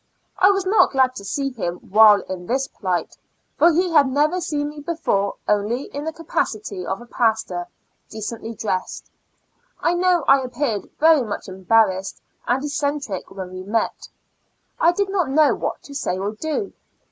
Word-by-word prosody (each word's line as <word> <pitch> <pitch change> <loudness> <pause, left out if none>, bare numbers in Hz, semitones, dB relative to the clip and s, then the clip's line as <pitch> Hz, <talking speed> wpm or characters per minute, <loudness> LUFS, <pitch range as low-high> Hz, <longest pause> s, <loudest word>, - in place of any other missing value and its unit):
I 380 - +6
was 390 -1 +1
not 395 -3 +4
glad 260 -1 +3
to 200 - -7
see 275 +7 -2
him 175 -8 -3
while 210 +2 +5
in 180 -2 -7
this 265 +2 0
plight, 180 - -3 0.4
for 340 - +5
he 355 +2 +1
had 295 -4 +5
never 300 +7 +1
seen 295 -4 -2
me 300 0 -10
before 290 -11 -1
only 210 +5 +1
in 285 +1 -4
the 320 - -2
capaci 290 -9 -2
ty 185 -3 -6
of 195 - -3
a - - -11
Pastor, 220 -7 -1 0.4
decently 225 +1 -6
dressed. 205 -3 -4 0.7
I 335 - +1
know 350 -2 +2
I 275 0 +6
appeared 250 -4 -3
very 315 -2 +6
much 215 -4 -5
embarrassed 190 0 +1 0.3
and 255 +3 +1
eccentric 285 -8 -3
when 190 -2 -7
we 185 - -6
met. 215 +4 -2 0.7
I 335 - +5
did 395 +2 -1
not 365 -7 0
know 300 +2 +4
what - - -4
to 285 - -11
say 230 -9 -2
or 200 +2 -2
do. 315 - -3
255 Hz, 170 wpm, -22 LUFS, 200-305 Hz, 0.7 s, I